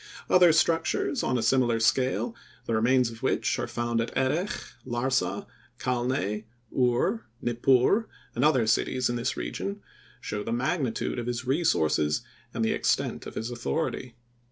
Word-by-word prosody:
Other 180 Hz, -2 st, +7 dB
structures 165 Hz, -, +1 dB
on 130 Hz, -, 0 dB
a 115 Hz, -, -1 dB
similar 120 Hz, -1 st, +3 dB
scale, 130 Hz, -, +1 dB, 0.3 s
the 115 Hz, -, -2 dB
remains 120 Hz, +2 st, +3 dB
of 115 Hz, +1 st, -12 dB
which 130 Hz, -, 0 dB
are -, -, -2 dB
found 120 Hz, -1 st, -1 dB
at 115 Hz, -, -2 dB
Erech, 150 Hz, +9 st, +1 dB, 0.3 s
Larsa, 130 Hz, +10 st, -1 dB, 0.3 s
Calneh, 120 Hz, -4 st, -1 dB, 0.3 s
Ur, 120 Hz, -2 st, +1 dB
Nippur 130 Hz, -, +2 dB, 0.2 s
and 120 Hz, -, -1 dB
other 135 Hz, -6 st, +4 dB
cities 120 Hz, +3 st, +1 dB
in -, -, -2 dB
this 120 Hz, +2 st, -2 dB
region, 200 Hz, +1 st, -4 dB, 0.4 s
show 105 Hz, 0 st, -4 dB
the 115 Hz, -, -4 dB
magnitude 125 Hz, 0 st, -1 dB
of 120 Hz, -, -4 dB
his 120 Hz, 0 st, -3 dB
resources 80 Hz, -, +1 dB, 0.3 s
and 115 Hz, -, -1 dB
the -, -, +2 dB
extent -, -, 0 dB
of -, -, -9 dB
his 115 Hz, +2 st, -3 dB
authority. 120 Hz, -, -3 dB
125 Hz, 150 wpm, -27 LUFS, 115-135 Hz, 0.4 s, Other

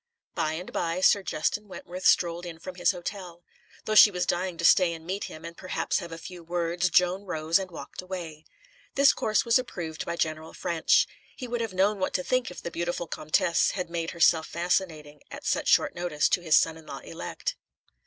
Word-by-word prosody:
By 155 Hz, 0 st, -1 dB
and 175 Hz, +3 st, -7 dB
by, 170 Hz, +1 st, -1 dB
Sir 200 Hz, +1 st, +5 dB
Justin 205 Hz, +4 st, -2 dB
Wentworth 185 Hz, -1 st, -4 dB
strolled 170 Hz, 0 st, +3 dB
in 170 Hz, -2 st, -7 dB
from 185 Hz, +3 st, -8 dB
his 180 Hz, -1 st, +1 dB
hotel. 175 Hz, -1 st, -5 dB, 0.4 s
Though 215 Hz, -, -1 dB
she 215 Hz, -, +9 dB
was 180 Hz, -3 st, -2 dB
dying 180 Hz, 0 st, -1 dB
to 170 Hz, -, -2 dB
stay 180 Hz, -1 st, +5 dB
and 165 Hz, -1 st, -10 dB
meet 190 Hz, +3 st, -3 dB
him, 155 Hz, +1 st, -10 dB
and 170 Hz, 0 st, -8 dB
perhaps 185 Hz, -, -2 dB
have 170 Hz, -3 st, -8 dB
a 165 Hz, -, -6 dB
few 175 Hz, +1 st, -10 dB
words, 175 Hz, +1 st, -1 dB
Joan 180 Hz, +3 st, +3 dB
rose 160 Hz, 0 st, +1 dB
and 190 Hz, -1 st, -5 dB
walked 170 Hz, -, -8 dB
away. 170 Hz, -4 st, -7 dB, 0.5 s
This 280 Hz, 0 st, +6 dB
course 215 Hz, +2 st, +1 dB
was 235 Hz, +2 st, +4 dB
approved 170 Hz, -10 st, -5 dB
by 170 Hz, -, -2 dB
General 160 Hz, -1 st, -3 dB
Ffrench. 175 Hz, -, +2 dB, 0.3 s
He 255 Hz, -, -6 dB
would 240 Hz, 0 st, -2 dB
have 225 Hz, -4 st, -3 dB
known 200 Hz, +2 st, +2 dB
what 185 Hz, -, -1 dB
to 180 Hz, -, 0 dB
think 255 Hz, +3 st, 0 dB
if 180 Hz, -, -10 dB
the 170 Hz, -, -4 dB
beautiful 175 Hz, +1 st, -2 dB
Comtesse 165 Hz, +1 st, +1 dB
had 180 Hz, -2 st, -4 dB
made 165 Hz, -1 st, -2 dB
herself 160 Hz, -1 st, +3 dB
fascinating, 165 Hz, -4 st, -2 dB
at -, -, -9 dB
such -, -, 0 dB
short -, -, +4 dB
notice, 175 Hz, -4 st, 0 dB
to 180 Hz, -, +2 dB
his 160 Hz, -3 st, +3 dB
son 160 Hz, 0 st, +3 dB
in 160 Hz, -, -15 dB
law -, -, -6 dB
elect. -, -, -5 dB
175 Hz, 210 wpm, -27 LUFS, 165-185 Hz, 0.5 s, she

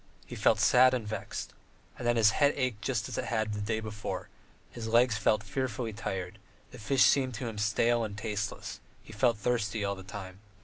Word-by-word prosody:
He -, -, -8 dB
felt -, -, +3 dB
sad 130 Hz, +1 st, +6 dB
and 115 Hz, -4 st, -4 dB
vexed. 110 Hz, -, -5 dB, 0.4 s
And 120 Hz, -, -4 dB
then 120 Hz, -, +3 dB
his 110 Hz, -2 st, +5 dB
head 145 Hz, +4 st, +3 dB
ached 125 Hz, -6 st, -1 dB
just 115 Hz, -2 st, -1 dB
as -, -, -4 dB
it -, -, -2 dB
had 110 Hz, -2 st, -1 dB
the 105 Hz, -, -3 dB
day 110 Hz, +2 st, -1 dB
before; 110 Hz, -1 st, -5 dB, 0.4 s
his 115 Hz, -2 st, -6 dB
legs 120 Hz, +1 st, +4 dB
felt 110 Hz, +1 st, +2 dB
fearfully 120 Hz, -1 st, -3 dB
tired, 95 Hz, -3 st, -5 dB
and -, -, -31 dB
the -, -, -11 dB
fish 135 Hz, +4 st, +3 dB
seemed 130 Hz, -3 st, +3 dB
to 120 Hz, +3 st, -4 dB
him 110 Hz, -2 st, -5 dB
stale 115 Hz, +3 st, +2 dB
and 105 Hz, -2 st, -5 dB
tasteless; 110 Hz, -1 st, -4 dB, 0.2 s
he 110 Hz, -, -12 dB
felt 115 Hz, +1 st, +2 dB
thirsty 110 Hz, -2 st, -1 dB
all 100 Hz, -, 0 dB
the 95 Hz, -, -9 dB
time. 95 Hz, 0 st, -8 dB
110 Hz, 210 wpm, -30 LUFS, 105-120 Hz, 0.4 s, sad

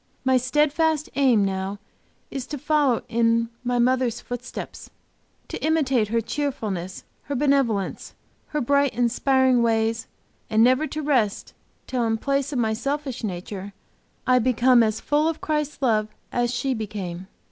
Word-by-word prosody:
My 260 Hz, 0 st, +4 dB
steadfast 300 Hz, +4 st, +1 dB
aim 250 Hz, -7 st, +4 dB
now 190 Hz, +1 st, -3 dB, 0.5 s
is 270 Hz, -3 st, -5 dB
to 295 Hz, -, -5 dB
follow 290 Hz, -3 st, +1 dB
in 230 Hz, 0 st, +2 dB
my 245 Hz, 0 st, 0 dB
mother's 250 Hz, -1 st, +2 dB
footsteps; 245 Hz, +1 st, -7 dB, 0.6 s
to -, -, -6 dB
imitate 270 Hz, -8 st, +2 dB
her 230 Hz, +2 st, 0 dB
cheerfulness, 215 Hz, -9 st, -3 dB, 0.2 s
her 285 Hz, -, -3 dB
benevolence, 270 Hz, -8 st, 0 dB, 0.3 s
her 300 Hz, -, -2 dB
bright, 280 Hz, +1 st, +2 dB
inspiring 255 Hz, +1 st, +3 dB
ways, 225 Hz, 0 st, +1 dB, 0.4 s
and 220 Hz, +1 st, +4 dB
never 255 Hz, +5 st, +3 dB
to 310 Hz, 0 st, -5 dB
rest 250 Hz, -9 st, 0 dB, 0.3 s
till 250 Hz, -2 st, -1 dB
in 225 Hz, 0 st, +1 dB
place 275 Hz, +3 st, -1 dB
of 275 Hz, -, -2 dB
my 220 Hz, -2 st, +1 dB
selfish 275 Hz, +1 st, -3 dB
nature 195 Hz, 0 st, -5 dB, 0.5 s
I 255 Hz, 0 st, +4 dB
become 250 Hz, 0 st, +4 dB
as 220 Hz, -1 st, +1 dB
full 295 Hz, +2 st, +1 dB
of 325 Hz, -1 st, -2 dB
Christ's 300 Hz, -2 st, -2 dB
love 215 Hz, -4 st, +2 dB, 0.2 s
as 240 Hz, -1 st, 0 dB
she 260 Hz, +2 st, -1 dB
became. 195 Hz, -5 st, -5 dB
245 Hz, 145 wpm, -24 LUFS, 225-280 Hz, 0.6 s, My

